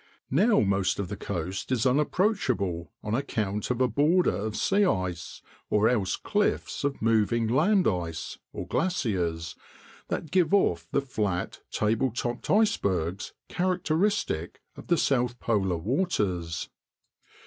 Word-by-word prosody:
Now 210 - +4
most 95 -2 +1
of 100 -3 -3
the - - -4
coast 90 +8 -4
is 125 -2 +1
unapproachable 130 - +1
on 105 - -3
account 105 -6 -1
of 125 -1 -1
a 130 - +5
border 160 +8 +3
of 105 +1 -3
sea 200 +1 +2
ice, 90 - -2 0.3
or 105 +1 +3
else 105 -7 +1
cliffs - - -1
of 140 -5 -2
moving 115 0 +2
land 180 - +3
ice 85 -3 -3 0.3
(glaciers) 90 - -1 0.5
that 155 - -4
give 185 0 +3
off 85 - +1
the 140 - +2
flat, 105 -9 -2
table 110 +5 +1
topped 120 +1 -4
icebergs 100 - +1
characteristic 180 - 0 0.2
of - - -11
the 170 - +3
south 125 -4 +1
polar 95 -6 0
waters. 95 - -1
115 Hz, 125 wpm, -27 LUFS, 95-155 Hz, 0.5 s, a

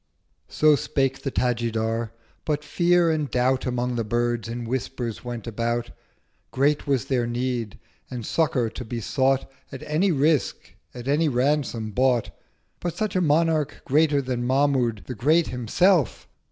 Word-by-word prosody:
So 155 -1 +4
spake 135 -1 -1
the 135 - -2
Tajidar: 115 -2 -1 0.3
but 150 -1 -1
Fear 175 +2 +3
and 155 -3 -1
Doubt 130 +1 +1
Among 125 0 -1
the 115 - 0
Birds 120 0 -1
in 120 +1 -4
Whispers 120 -2 -4
went 120 -2 -6
about: 120 +1 -2 0.6
Great 145 +3 +1
was 135 -4 +1
their 125 -3 0
Need: 120 -3 -2 0.3
and 120 -3 -6
Succour 125 -7 +1
to - - -7
be 115 +1 -5
sought 135 +3 +1 0.2
At 135 - -8
any 170 +6 +1
Risk: 150 0 0 0.2
at 120 +1 -8
any 150 +3 +2
Ransom 125 -4 0
bought: 125 0 +1 0.5
But 175 -2 -4
such 215 -3 -2
a 185 - +2
Monarch—greater 150 -2 +2
than 125 -2 -2
Mahmud 130 -4 +1
The 130 - -5
Great 155 +8 +2
Himself! 140 - +1
130 Hz, 145 wpm, -24 LUFS, 120-150 Hz, 0.6 s, So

